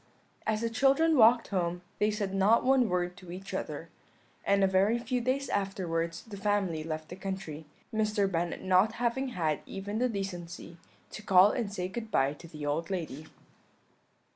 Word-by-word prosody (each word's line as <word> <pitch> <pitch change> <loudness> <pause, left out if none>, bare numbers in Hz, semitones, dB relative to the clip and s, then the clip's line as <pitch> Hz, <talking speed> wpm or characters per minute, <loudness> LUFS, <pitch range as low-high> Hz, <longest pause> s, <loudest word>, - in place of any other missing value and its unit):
"As 215 0 +1
the 230 - 0
children 275 +7 +4
walked 235 -1 +6
home 175 -2 -1 0.2
they 210 - +3
said 205 -2 -2
not 200 +4 +4
one 255 -3 +4
word 180 0 -1
to 180 -1 -11
each 190 +2 -8
other; - - -4 0.5
and 200 0 +3
a - - +5
very 195 +5 +3
few 250 +1 -2
days 260 +3 0
afterwards 170 -4 -2
the 210 -3 -9
family 195 -6 0
left 155 -1 -5
the 180 - -7
country, 190 -6 -6 0.3
Mr. 215 -2 +1
Bennet 170 -2 -2
not 190 +4 +4
having 245 +3 -1
had 160 - -1
even 205 +3 -4
the 250 +1 +2
decency 175 -5 -6 0.3
to - - -7
call 195 0 +6
and 230 -5 -2
say 180 -3 -3
good 220 +3 -6
bye 135 -7 +2
to 170 +3 -13
the 150 -2 -7
old 155 +3 -1
lady. 160 -5 -4
195 Hz, 175 wpm, -30 LUFS, 175-220 Hz, 0.5 s, walked